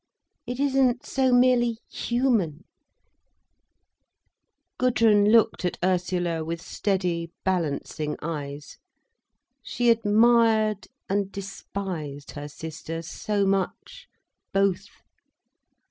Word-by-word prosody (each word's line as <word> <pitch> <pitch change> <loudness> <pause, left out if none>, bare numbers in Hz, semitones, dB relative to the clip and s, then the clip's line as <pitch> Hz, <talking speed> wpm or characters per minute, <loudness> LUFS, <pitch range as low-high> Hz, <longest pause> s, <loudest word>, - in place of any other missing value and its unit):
It 245 +1 -4
isn't 265 -3 +2
so 260 -1 +1
merely 245 -2 +4
human." 225 - 0 2.2
Gudrun 225 -5 +4
looked 230 -4 +4
at 180 - -1
Ursula 180 -2 0
with 165 +1 -4
steady, 180 -2 -2 0.2
balancing 155 -4 -1
eyes. 145 -3 -6 0.8
She 235 +1 +1
admired 220 -1 +3 0.2
and 200 0 -1
despised 185 -7 -6
her 145 0 -7
sister 160 +2 -7
so 200 +4 -1
much, 195 -1 -2 0.4
both! 195 0 +1
195 Hz, 85 wpm, -25 LUFS, 165-230 Hz, 2.2 s, merely